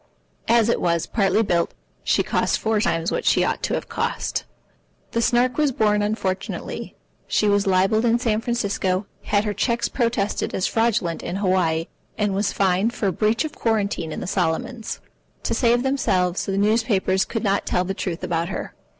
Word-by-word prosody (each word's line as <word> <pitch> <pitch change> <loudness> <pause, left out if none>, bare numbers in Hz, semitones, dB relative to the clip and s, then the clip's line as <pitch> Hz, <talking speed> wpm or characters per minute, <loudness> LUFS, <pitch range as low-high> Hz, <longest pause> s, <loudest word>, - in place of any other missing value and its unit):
As 230 -1 +4
it 235 - +1
was, 170 -1 +1
partly 205 0 +2
built, 170 -4 0 0.3
she - - +2
cost - - +1
four 220 -1 +1
times 165 -3 0
what - - -1
she - - +3
ought - - -1
to - - 0
have - - -4
cost. - - -2 0.7
The 230 - 0
Snark 245 +2 +2
was 295 -2 +3
born 210 -3 +2
unfortunately. 205 -3 -3 0.3
She 210 - +2
was 205 0 +2
libelled 195 +4 +3
in 235 0 +4
San 225 -3 0
Francisco, 200 -5 -1 0.2
had 205 -1 +2
her 210 -1 -1
cheques 235 +2 0
protested 230 -5 -1
as 185 - 0
fraudulent 220 -7 +1
in 175 - -4
Hawaii, 185 -5 +1 0.3
and 210 -2 0
was 200 +1 0
fined 195 +4 +1
for 200 -3 0
breach 215 - +1
of 305 - -5
quarantine 200 - -1
in - - -5
the - - -4
Solomons. 185 +6 -2 0.4
To - - -1
save 240 +1 +3
themselves, 190 -10 +1
the 195 0 -1
newspapers 205 -3 +2
could 225 -1 -4
not 200 -1 +1
tell 180 - +1
the 190 +1 -3
truth 180 -3 -4
about 170 0 -1
her. - - -5
205 Hz, 175 wpm, -23 LUFS, 185-230 Hz, 0.7 s, As